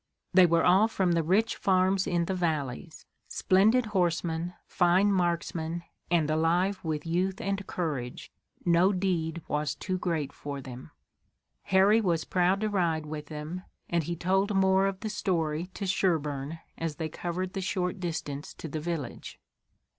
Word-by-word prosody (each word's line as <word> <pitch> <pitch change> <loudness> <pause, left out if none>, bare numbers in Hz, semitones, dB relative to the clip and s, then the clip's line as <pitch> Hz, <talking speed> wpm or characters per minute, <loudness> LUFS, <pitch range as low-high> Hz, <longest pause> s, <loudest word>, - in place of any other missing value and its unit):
They 185 -1 +7
were 170 0 +3
all 190 +5 +5
from 190 -5 0
the 170 -1 +2
rich 195 +8 +2
farms 190 0 +2
in 175 -1 +1
the 190 - -2
valleys. 160 -4 -3 0.2
Splendid 220 +6 +3
horsemen, 175 -3 -1
fine 180 +3 +3
marksmen, 170 -2 -1 0.3
and 165 -3 +2
alive 170 +5 +1
with 155 -2 -2
youth 185 +4 0
and 200 -3 -2
courage, 145 -8 -4 0.3
no 175 +3 +4
deed 170 -4 -1
was 150 -1 -1
too 185 +5 -3
great 160 -6 -2
for 140 -1 -6
them. 130 -1 -9 0.8
Harry 195 +4 +5
was 170 -6 0
proud 185 +2 +2
to 215 - +1
ride 170 -6 0
with 150 -1 -6
them, 155 +4 -6 0.3
and 170 -3 +1
he 170 - -2
told 195 +4 +1
more 190 0 +4
of 195 -1 -4
the 220 - -3
story 170 -5 -1
to 200 - -4
Sherburne 155 -6 0 0.2
as 165 -2 -2
they 160 +1 -3
covered 175 +3 -4
the 195 - -3
short 180 0 -2
distance 160 -5 -4
to - - -7
the 155 +1 -4
village. 155 -5 -5
175 Hz, 155 wpm, -28 LUFS, 160-190 Hz, 0.8 s, They